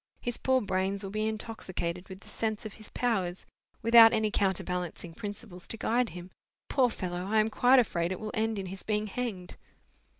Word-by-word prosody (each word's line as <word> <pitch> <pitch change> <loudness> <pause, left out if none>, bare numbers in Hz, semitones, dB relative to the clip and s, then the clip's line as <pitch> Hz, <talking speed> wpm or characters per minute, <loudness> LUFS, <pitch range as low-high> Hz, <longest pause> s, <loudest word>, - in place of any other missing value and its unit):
His 240 -1 -3
poor 260 0 +3
brains 190 0 -1
will 195 - -5
be 215 +1 0
intoxicated 185 -5 -4
with 190 +1 -9
the - - -17
sense 220 -1 -2
of 215 - -6
his 215 - -12
powers, 190 -7 -1 0.4
without 230 0 +9
any 215 -1 +1
counterbalancing 180 -3 -1
principles 205 -2 -6
to 225 - -4
guide 240 +2 +1
him. 180 +2 -9 0.4
Poor 260 -3 +4
fellow! 180 -4 -4
I 215 +2 +3
am 215 +1 +2
quite 250 +4 +5
afraid 175 -8 +2
it 185 - -3
will 215 -1 -5
end 220 -1 0
in 195 - -3
his 190 +1 -6
being 210 -1 -1
hanged!" 205 -5 -4
210 Hz, 190 wpm, -30 LUFS, 185-225 Hz, 0.4 s, without